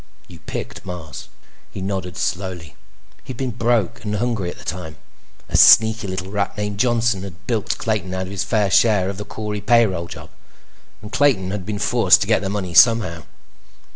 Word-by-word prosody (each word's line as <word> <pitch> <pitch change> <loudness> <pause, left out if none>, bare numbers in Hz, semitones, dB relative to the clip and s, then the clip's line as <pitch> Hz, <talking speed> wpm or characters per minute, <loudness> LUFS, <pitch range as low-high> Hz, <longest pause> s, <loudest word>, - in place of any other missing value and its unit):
You - - -13
picked - - -7
Mars." 90 -4 -8 0.4
He - - -9
nodded 95 -2 -4
slowly. 90 -4 -4 0.5
He'd 130 - -8
been 130 -1 -2
broke 115 -4 0
and 105 -1 -3
hungry 110 -4 -1
at - - -9
the - - -14
time. 80 0 -6 0.5
A - - -4
sneaky 110 -1 +6
little 95 0 -5
rat 100 -1 -2
named 105 -1 -3
Johnson 120 -4 +1
had 95 -1 -10
bilked 115 -2 -1
Clayton 105 -5 -2
out 95 0 -3
of - - -9
his 100 0 -2
fair 100 0 0
share 100 -3 +3
of 95 - -10
the 105 - -6
Corey 105 -1 -5
payroll 100 -8 +2
job, - - -11 0.7
and 105 - -9
Clayton 115 -9 +2
had 100 -3 -5
been 105 -1 -3
forced 105 - +4
to - - -1
get - - +2
the 95 - -3
money 95 -3 -4
somehow. 110 -7 +4
100 Hz, 185 wpm, -20 LUFS, 95-110 Hz, 0.7 s, sneaky